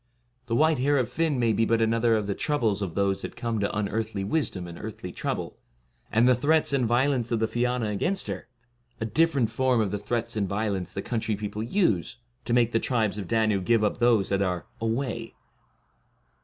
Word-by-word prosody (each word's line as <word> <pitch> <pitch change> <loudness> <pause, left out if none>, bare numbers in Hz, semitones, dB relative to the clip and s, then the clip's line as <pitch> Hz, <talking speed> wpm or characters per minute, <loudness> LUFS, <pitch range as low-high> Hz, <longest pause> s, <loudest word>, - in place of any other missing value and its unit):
The 115 - 0
white 155 +1 +3
hair 145 +3 +2
of 125 -3 0
Fionn 160 -4 0
may 115 -2 +2
be 115 - +2
but 115 0 +2
another 115 +1 +2
of 105 -2 0
the 100 - -1
troubles 115 -6 0
of 95 -5 -4
those 100 -1 +1
that - - -7
come 115 -2 -2
to 100 0 -1
unearthly 105 -1 -2
wisdom 100 - -1
and 85 -1 -9
earthly - - -7
trouble, - - -4 0.5
and 115 +3 +4
the 125 - +6
threats 145 +4 +2
and 130 -4 +2
violence 125 0 +1
of 115 - +1
the 110 - +2
Fiana 120 -1 0
against 190 - 0
her, - - -5 0.5
a 110 - -2
differ 150 +8 +2
ent 115 -4 +1
form 130 +1 +2
of 105 -4 0
the 105 - -2
threats 115 +2 -2
and 100 -3 -1
violence 100 -2 -2
the 100 - -5
coun 120 - -2
try 110 -1 -1
people 105 +1 -5
use, 115 - 0 0.3
to 120 - -1
make 120 -1 +3
the 115 - +2
Tribes 110 -5 0
of 95 - -5
Danu 110 -2 +2
give 115 +3 +2
up 105 - 0
those 115 -5 +3
that 100 0 +1
are 90 -3 -1
* - - -32
away. 115 0 -2
115 Hz, 215 wpm, -26 LUFS, 105-125 Hz, 0.5 s, the